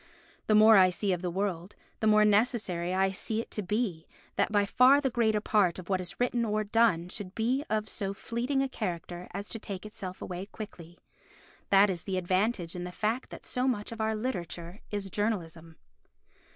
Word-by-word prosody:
The 215 Hz, -, +4 dB
more 215 Hz, 0 st, +8 dB
I 185 Hz, -1 st, +7 dB
see 190 Hz, +2 st, -1 dB
of 175 Hz, -, -3 dB
the 180 Hz, -, -2 dB
world, 185 Hz, 0 st, -3 dB, 0.2 s
the 220 Hz, -, +1 dB
more 215 Hz, 0 st, +6 dB
necessary 205 Hz, -5 st, +1 dB
I 190 Hz, +1 st, +2 dB
see 215 Hz, +3 st, -3 dB
it 230 Hz, -, -5 dB
to 210 Hz, -, -2 dB
be 195 Hz, -4 st, -2 dB, 0.3 s
that -, -, +1 dB
by 205 Hz, -1 st, +3 dB
far 255 Hz, +7 st, +6 dB
the 270 Hz, -3 st, -1 dB
greater 220 Hz, -3 st, +2 dB
part 200 Hz, -5 st, +2 dB
of 185 Hz, 0 st, -9 dB
what 190 Hz, -1 st, +1 dB
is 175 Hz, -, -7 dB
written 245 Hz, -1 st, +1 dB
or 215 Hz, -1 st, 0 dB
done 210 Hz, -5 st, +2 dB
should 190 Hz, 0 st, -6 dB
be 250 Hz, +5 st, +1 dB
of 215 Hz, 0 st, 0 dB
so 195 Hz, -2 st, -3 dB
fleeting 245 Hz, +7 st, -1 dB
a -, -, 0 dB
character 180 Hz, -6 st, -5 dB
as 200 Hz, +2 st, -5 dB
to 225 Hz, -, -5 dB
take 200 Hz, -2 st, -6 dB
itself 205 Hz, -4 st, -7 dB
away 180 Hz, +2 st, -6 dB
quickly. 175 Hz, -6 st, -10 dB, 0.7 s
That 200 Hz, 0 st, +6 dB
is 175 Hz, -2 st, -5 dB
the 190 Hz, -2 st, -2 dB
advantage 185 Hz, 0 st, 0 dB
in 175 Hz, -, -4 dB
the 180 Hz, -, -5 dB
fact 220 Hz, +7 st, -2 dB
that -, -, -10 dB
so 250 Hz, +1 st, -1 dB
much 220 Hz, -5 st, -1 dB
of 225 Hz, -1 st, -5 dB
our 220 Hz, 0 st, 0 dB
literature 180 Hz, -, -5 dB
is 200 Hz, -2 st, -4 dB
journalism. 170 Hz, -6 st, -3 dB
205 Hz, 200 wpm, -29 LUFS, 180-220 Hz, 0.7 s, more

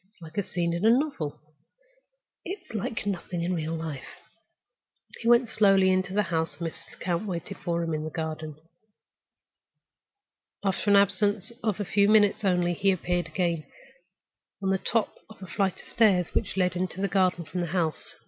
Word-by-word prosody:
"It's 210 Hz, -, -29 dB
like 160 Hz, +2 st, -6 dB
a -, -, +3 dB
scene 175 Hz, -3 st, -2 dB
in 170 Hz, +3 st, -2 dB
a 220 Hz, -, +6 dB
novel—it's 310 Hz, -, -5 dB
like 220 Hz, +1 st, -3 dB
nothing 180 Hz, -3 st, -3 dB
in 180 Hz, +2 st, 0 dB
real 165 Hz, -1 st, -2 dB
life." 155 Hz, -5 st, -6 dB, 1.0 s
He 230 Hz, -, -4 dB
went 240 Hz, +1 st, +6 dB
slowly 195 Hz, -3 st, +4 dB
into 185 Hz, 0 st, +1 dB
the 210 Hz, +2 st, +2 dB
house, 160 Hz, -3 st, -1 dB
and 170 Hz, -, -2 dB
Mrs. -, -, -14 dB
Lecount 175 Hz, +3 st, -2 dB
waited 185 Hz, +1 st, -5 dB
for 170 Hz, -2 st, -1 dB
him 165 Hz, -1 st, -2 dB
in 155 Hz, 0 st, -2 dB
the 155 Hz, -, -3 dB
garden. 155 Hz, -1 st, -4 dB, 2.1 s
After 195 Hz, +1 st, 0 dB
an 200 Hz, -, +6 dB
absence 200 Hz, +2 st, +2 dB
of 215 Hz, -3 st, -1 dB
a 205 Hz, -, -1 dB
few 200 Hz, +2 st, +3 dB
minutes 210 Hz, -1 st, +4 dB
only 180 Hz, -2 st, +2 dB
he 195 Hz, +3 st, +1 dB
appeared 180 Hz, -2 st, 0 dB
again, 170 Hz, -4 st, -1 dB, 1.0 s
on 190 Hz, -, +2 dB
the 190 Hz, -, +1 dB
top 225 Hz, +1 st, 0 dB
of 220 Hz, -, -13 dB
the 190 Hz, -, -9 dB
flight 190 Hz, 0 st, -1 dB
of -, -, -13 dB
steps 195 Hz, -6 st, +3 dB
which -, -, -1 dB
led 180 Hz, -1 st, +2 dB
into 180 Hz, 0 st, -3 dB
the 200 Hz, -, +1 dB
garden 185 Hz, -3 st, +1 dB
from 180 Hz, -, -4 dB
the 175 Hz, -, -1 dB
house. 165 Hz, -3 st, -2 dB
185 Hz, 175 wpm, -27 LUFS, 170-205 Hz, 2.1 s, a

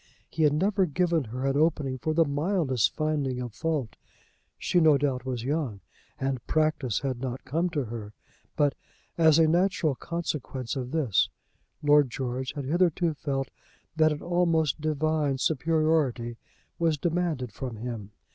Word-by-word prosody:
He 160 Hz, -, -3 dB
had 150 Hz, -2 st, +5 dB
never 190 Hz, +4 st, +2 dB
given 170 Hz, -1 st, +1 dB
her 125 Hz, +4 st, -4 dB
an 135 Hz, 0 st, +1 dB
opening 145 Hz, -4 st, +1 dB
for 155 Hz, +4 st, -1 dB
the 165 Hz, 0 st, +5 dB
mildest 145 Hz, -, +1 dB
finding 145 Hz, -5 st, -1 dB
of 120 Hz, -3 st, -5 dB
fault. 150 Hz, -7 st, -2 dB, 0.6 s
She, 180 Hz, -, +1 dB
no 155 Hz, -3 st, +6 dB
doubt, 130 Hz, -3 st, -1 dB
was 125 Hz, -3 st, -3 dB
young, 135 Hz, -7 st, -2 dB, 0.4 s
and 135 Hz, -2 st, -2 dB
practise 155 Hz, -7 st, +1 dB
had 130 Hz, -3 st, -2 dB
not 130 Hz, -1 st, -4 dB
come 165 Hz, +7 st, 0 dB
to 150 Hz, -5 st, -1 dB
her. 110 Hz, -3 st, -7 dB, 0.4 s
But, 145 Hz, -2 st, +3 dB, 0.4 s
as 160 Hz, -2 st, +5 dB
a 165 Hz, -1 st, +5 dB
natural 175 Hz, -2 st, +2 dB
consequence 140 Hz, -6 st, -4 dB
of 125 Hz, -2 st, -3 dB
this, 135 Hz, -10 st, +2 dB, 0.5 s
Lord 145 Hz, -2 st, +5 dB
George 130 Hz, +1 st, -3 dB
had 145 Hz, -3 st, -5 dB
hitherto 170 Hz, +2 st, +2 dB
felt 135 Hz, -2 st, -3 dB, 0.4 s
that 155 Hz, -1 st, +4 dB
an 150 Hz, -, -4 dB
almost 165 Hz, -4 st, +1 dB
divine 155 Hz, -2 st, 0 dB
superiority 155 Hz, -5 st, +1 dB, 0.4 s
was 165 Hz, -2 st, +2 dB
demanded 165 Hz, -7 st, -1 dB
from 125 Hz, +2 st, -6 dB
him. 110 Hz, -3 st, -6 dB
145 Hz, 150 wpm, -27 LUFS, 130-160 Hz, 0.6 s, no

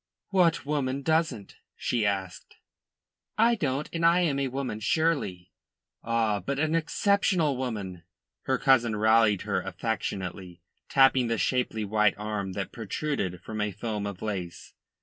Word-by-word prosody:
"What 175 Hz, -6 st, +2 dB
woman 140 Hz, -2 st, -1 dB
doesn't?" 160 Hz, -10 st, 0 dB, 0.2 s
she 115 Hz, -4 st, 0 dB
asked. 95 Hz, -2 st, -4 dB, 0.8 s
"I 230 Hz, +2 st, +5 dB
don't, 145 Hz, -, -1 dB
and 165 Hz, 0 st, -2 dB
I 170 Hz, +2 st, +5 dB
am 145 Hz, -6 st, +1 dB
a 135 Hz, -, 0 dB
woman, 130 Hz, -4 st, -4 dB
surely." 110 Hz, -, 0 dB, 0.5 s
"Ah, 115 Hz, -3 st, +1 dB
but 140 Hz, +6 st, -3 dB
an 155 Hz, +2 st, 0 dB
exceptional 165 Hz, -2 st, +2 dB
woman," 105 Hz, -9 st, -4 dB, 0.4 s
her 130 Hz, -, +1 dB
cousin 120 Hz, -5 st, +3 dB
rallied 110 Hz, -2 st, +3 dB
her 100 Hz, -3 st, -1 dB
affectionately, 95 Hz, -3 st, -4 dB, 0.3 s
tapping 135 Hz, -2 st, +4 dB
the 115 Hz, 0 st, 0 dB
shapely 110 Hz, +1 st, 0 dB
white 105 Hz, 0 st, +2 dB
arm 105 Hz, -2 st, -3 dB
that 95 Hz, 0 st, -4 dB
protruded 105 Hz, -, -3 dB
from 110 Hz, -1 st, -4 dB
a 105 Hz, 0 st, 0 dB
foam 105 Hz, 0 st, -4 dB
of 100 Hz, -3 st, -7 dB
lace. 95 Hz, -5 st, -5 dB
115 Hz, 140 wpm, -27 LUFS, 100-145 Hz, 0.8 s, I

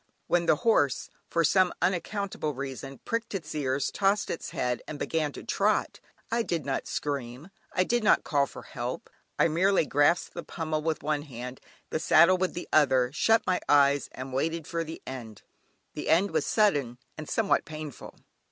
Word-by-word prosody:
When 175 Hz, -1 st, +1 dB
the -, -, +5 dB
horse, 145 Hz, -, +2 dB, 0.2 s
for 170 Hz, -, +2 dB
some 185 Hz, +3 st, +4 dB
unaccountable 185 Hz, -4 st, -1 dB
reason, 135 Hz, 0 st, -6 dB
pricked 230 Hz, -2 st, -2 dB
its 160 Hz, -5 st, -5 dB
ears, 140 Hz, -1 st, -1 dB
tossed 200 Hz, +1 st, +1 dB
its 165 Hz, -, -5 dB
head, 125 Hz, 0 st, -2 dB
and 155 Hz, -, -6 dB
began 155 Hz, 0 st, -1 dB
to -, -, -9 dB
trot, -, -, 0 dB, 0.3 s
I 235 Hz, +1 st, +2 dB
did 170 Hz, -, -2 dB
not 135 Hz, -, -2 dB
scream, 140 Hz, +2 st, -4 dB, 0.2 s
I 185 Hz, -, +3 dB
did 240 Hz, +4 st, 0 dB
not 215 Hz, -, +4 dB
call 140 Hz, -2 st, +1 dB
for -, -, -10 dB
help, -, -, -6 dB, 0.3 s
I -, -, +4 dB
merely 175 Hz, +2 st, +3 dB
grasped 145 Hz, +5 st, +2 dB
the 170 Hz, -, -5 dB
pummel 160 Hz, -2 st, -3 dB
with 160 Hz, 0 st, -2 dB
one 150 Hz, 0 st, 0 dB
hand, 125 Hz, -3 st, -8 dB, 0.3 s
the -, -, 0 dB
saddle 170 Hz, +3 st, +5 dB
with 185 Hz, 0 st, -1 dB
the 175 Hz, -, -5 dB
other, 130 Hz, -5 st, +4 dB
shut 225 Hz, +8 st, +3 dB
my 180 Hz, -1 st, +1 dB
eyes 140 Hz, -1 st, +4 dB
and 130 Hz, 0 st, -7 dB
waited 160 Hz, +4 st, -1 dB
for 165 Hz, +1 st, -2 dB
the 160 Hz, 0 st, -9 dB
end. 115 Hz, -5 st, -8 dB, 0.5 s
The -, -, -5 dB
end 185 Hz, +5 st, +4 dB
was -, -, 0 dB
sudden 145 Hz, -, +2 dB, 0.2 s
and 155 Hz, -1 st, -8 dB
somewhat 225 Hz, -3 st, +2 dB
painful. 155 Hz, -3 st, -8 dB
155 Hz, 180 wpm, -28 LUFS, 140-180 Hz, 0.5 s, the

